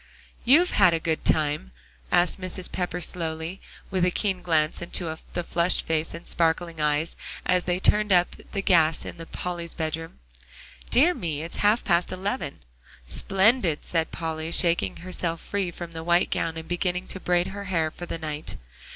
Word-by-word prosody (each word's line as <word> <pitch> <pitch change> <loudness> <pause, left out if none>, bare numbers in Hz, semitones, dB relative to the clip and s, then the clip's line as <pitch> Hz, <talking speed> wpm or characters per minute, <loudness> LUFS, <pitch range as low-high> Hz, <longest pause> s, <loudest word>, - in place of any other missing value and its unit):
"You've 320 +9 +5
had 180 -4 +5
a - - -1
good 160 0 -1
time?" 145 - 0 0.4
asked 175 +2 +3
Mrs. 185 0 -1
Pepper 180 -1 -2
slowly, 165 +1 -3 0.3
with 185 -2 +1
a 180 - +4
keen 190 0 -1
glance 160 -3 +1
into 170 -2 -3 0.2
the 175 - -2
flushed 170 +1 +2
face 160 0 -1
and 170 - -10
sparkling 165 -1 +1
eyes, 150 +2 +1 0.3
as 180 -1 +2
they 180 0 0
turned 210 +2 +3
up 175 -1 +4 0.2
the 195 -2 -2
gas 165 -5 +3
in 165 - -7
Polly's 175 -2 -4
bedroom. 165 0 -4 0.7
"Dear 310 +9 +5
me! 160 - -3
it 165 - -6
is - - -6
half 210 +3 +3
past 175 -2 +2
eleven." 185 - -3 0.4
"Splendid," 190 - +2
said 165 -2 -1
Polly, 160 0 -4
shaking 170 0 +4
herself 175 -2 -3
free 200 -3 -2
from 175 0 -8
the 160 -1 -6
white 175 +1 +2
gown 165 -1 -1
and 160 0 -7
beginning 180 +1 -1
to 190 - -1
braid 175 -1 +1
her 200 +1 -6
hair 165 -5 0
for 175 - -8
the - - -4
night. 155 -1 -4
175 Hz, 175 wpm, -26 LUFS, 160-185 Hz, 0.7 s, You've